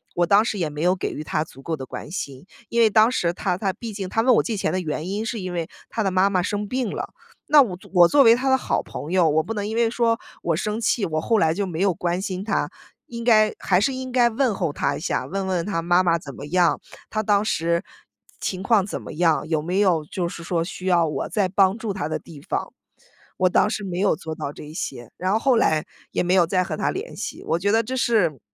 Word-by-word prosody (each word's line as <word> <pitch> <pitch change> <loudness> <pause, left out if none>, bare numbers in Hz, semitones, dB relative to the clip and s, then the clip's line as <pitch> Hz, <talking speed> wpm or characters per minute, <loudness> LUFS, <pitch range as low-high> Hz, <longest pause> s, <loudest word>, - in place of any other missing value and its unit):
我 175 - +3
当 200 +4 +5
时 220 -2 -2
也 165 - 0
没 150 0 -6
有 180 +2 +3
给 - - -3
予 155 - -6
他 155 - -1
足 135 - -15
够 160 +3 -3
的 130 - -6
关 150 - -8
心。 140 -4 -6 0.2
因 235 - +2
为 225 - +6
当 215 +2 +5
时 170 -8 +1
他 180 -1 -1
他 195 -1 0
毕 230 -2 -7
竟 195 -2 -4
他 225 - +1
问 250 0 +4
我 - - +3
借 225 - -2
钱 - - 0
的 185 - 0
原 155 0 -3
因 205 +3 -2
是 230 -1 -3
因 185 -2 -5
为 170 -2 -2 0.2
他 220 - -2
的 195 - 0
妈 185 +2 +3
妈 185 -2 +1
生 205 +2 -2
病 250 0 -1
了， - - -4 0.4
那 295 -1 +7
我 190 -9 -1 0.2
我 175 -2 +7
作 285 +5 +5
为 230 0 +7
他 265 +2 -1
的 265 - +5
好 - - -1
朋 155 - -7
友， 180 -3 +4
我 155 +1 +2
不 225 - -4
能 205 -1 -3
因 220 - -4
为 230 -1 +3
说 230 -1 +1 0.2
我 170 - +1
生 210 +6 -2
气， 225 -2 +1
我 155 -3 -1
后 225 +4 +2
来 160 -3 +3
就 200 +3 -1
没 170 -4 -5
有 195 -2 +3
关 175 +2 -2
心 190 -1 -4
他， 195 -8 -1 0.4
应 235 -1 -6
该 215 -3 +4
还 180 -2 +2
是 265 +6 +1
应 260 0 -5
该 245 -1 +4
问 235 0 +1
候 170 -5 -1
他 140 0 -1
一 - - -7
下， - - -2
问 195 +1 -3
问 180 -3 -1
他 195 -5 -1
妈 175 +2 +3
妈 170 -2 +3
怎 140 -4 -9
么 140 - -8
样， 170 -2 +2 0.3
他 215 - -1
当 205 0 +3
时 170 -1 0 0.6
情 185 -1 -3
况 205 -2 +3
怎 - - -5
么 - - -8
样， 165 0 +2
有 155 -2 +1
没 180 +4 -2
有 170 -6 +2
就 175 +3 -3
是 170 - -8
说 170 -1 0
需 185 +1 -7
要 175 -2 +4
我 150 - -3
再 205 -4 +1
帮 195 +1 +3
助 220 -2 -3
他 155 -6 -3
的 - - -2
地 155 -4 -13
方。 - - -3 0.7
我 185 0 +3
当 210 - +3
时 215 -1 -3
没 180 -2 -4
有 200 -3 +3
做 160 +1 -6
到 140 - -4
这 - - -10
一 150 - -10
些， 120 - -5
然 185 +1 -1
后 220 - +2
后 260 +1 +3
来 155 -7 +2 0.3
也 - - 0
没 180 +1 +1
有 180 -3 +5
再 185 +1 +1
和 - - -4
他 - - 0
联 410 +6 -6
系。 - - -6
我 165 - +1
觉 200 +3 +1
得 225 +1 +3
这 260 +4 -4
是 200 - +2
185 Hz, 290 characters per minute, -23 LUFS, 170-220 Hz, 0.7 s, 那